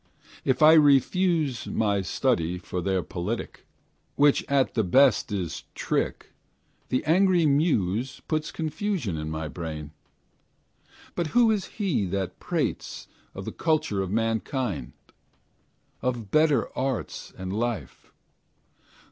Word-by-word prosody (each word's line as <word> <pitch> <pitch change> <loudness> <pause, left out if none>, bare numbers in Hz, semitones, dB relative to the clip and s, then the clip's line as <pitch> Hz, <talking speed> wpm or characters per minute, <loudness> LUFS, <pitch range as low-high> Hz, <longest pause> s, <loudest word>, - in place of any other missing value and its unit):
If 130 +2 +2
I 155 +1 +9
refuse 155 -1 +3
My 100 -3 +1
study 85 -1 0
for 90 0 -5
their 95 0 0
politique, 85 +2 -5 0.5
Which 145 0 +4
at 140 -2 +2
the 110 - +1
best 130 +6 +4
is 95 -5 -3
trick, - - -2 0.6
The 130 - 0
angry 180 +1 +4
Muse 130 - +1
Puts 155 -1 -1
confusion 160 - -2
in 75 0 -4
my 80 0 -3
brain. 75 -2 -6 1.2
But 170 - -1
who 235 -2 +6
is 205 -4 0
he 180 - 0
that 95 0 -3
prates - - -3 0.3
Of - - -6
the - - -4
culture 155 -11 0
of 95 - -3
mankind, 115 - -1 1.1
Of 120 -5 -3
better 155 -2 +2
arts 130 -2 -3
and 95 0 -5
life? 110 - -4
125 Hz, 120 wpm, -26 LUFS, 95-155 Hz, 1.2 s, I